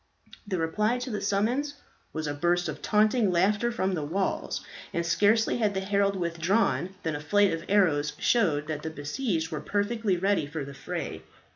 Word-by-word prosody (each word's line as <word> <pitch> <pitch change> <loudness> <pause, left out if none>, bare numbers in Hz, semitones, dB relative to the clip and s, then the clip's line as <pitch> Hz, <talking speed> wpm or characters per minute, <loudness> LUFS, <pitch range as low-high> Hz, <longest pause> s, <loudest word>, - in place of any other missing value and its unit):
The 190 -2 -1
reply 210 +9 +1
to 250 +1 -5
the 210 - -3
summons 240 +9 0 0.4
was 155 - -4
a 145 - -2
burst 175 +4 +1
of 150 -1 -5
taunting 215 +1 +3
laughter 200 +6 +2
from 195 -5 -1
the 165 - -1
walls; 185 +6 -2 0.3
and 170 0 -1
scarcely 210 +7 +3
had 210 -3 +1
the - - +1
herald 200 0 +1
withdrawn, 180 +2 0
than 160 -3 -1
a - - -3
flight 205 +5 +3
of 165 0 -4
arrows 155 -8 +3
showed 165 -11 +2
that 150 -1 -4
the 160 - -4
besieged 160 - -2
were - - -3
perfectly 205 -1 0
ready 195 -4 +1
for 145 -1 -5
the 140 - -9
fray. 135 - -5
190 Hz, 180 wpm, -28 LUFS, 160-210 Hz, 0.4 s, taunting